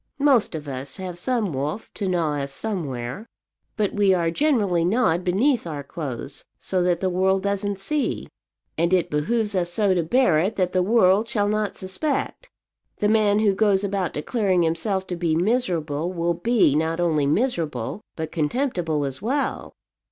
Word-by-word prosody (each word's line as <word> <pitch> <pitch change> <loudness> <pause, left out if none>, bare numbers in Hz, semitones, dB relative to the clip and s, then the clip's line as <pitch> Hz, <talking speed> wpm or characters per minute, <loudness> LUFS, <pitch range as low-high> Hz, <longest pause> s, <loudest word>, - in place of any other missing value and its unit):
Most 255 - +3
of 150 -2 -6
us 135 0 -5
have 185 -2 -5
some 215 - -1
wolf 145 +10 -4
to 200 - -3
gnaw 165 -5 0
us 140 0 -4
somewhere; 145 - -4 0.5
but 210 -2 0
we 200 -2 +3
are 170 -2 0
generally 205 - +2
gnawed 180 -3 +2
beneath 210 +5 +1
our 145 -3 -5
clothes, 140 -2 -6
so 185 -1 -1
that 175 -1 +1
the 190 - +1
world 190 +1 +2
doesn't 200 0 -1
see; 285 +9 -2 0.5
and 170 +3 +3
it 180 - 0
behoves 210 +9 0
us 175 -2 0
so 200 0 +2
to 180 - +1
bear 175 -1 +3
it 195 +7 0
that 185 -2 0
the 185 - +3
world 205 +1 +4
shall 205 -3 0
not 210 0 -1
suspect. 280 - -3 0.5
The 210 - +1
man 215 -1 +3
who 205 -2 +3
goes 200 -1 +2
about 195 -3 -1
declaring 185 +2 +1
himself 185 +4 -1
to 180 - -4
be 170 -2 0
miserable 170 - 0
will 170 -1 0
be 205 - +2
not 160 +2 0
only 155 -5 +2
miserable, 165 - -1
but 160 -1 -5
contemptible 165 - -1
as 135 -1 -5
well." 270 +7 -2
185 Hz, 170 wpm, -23 LUFS, 160-210 Hz, 0.5 s, world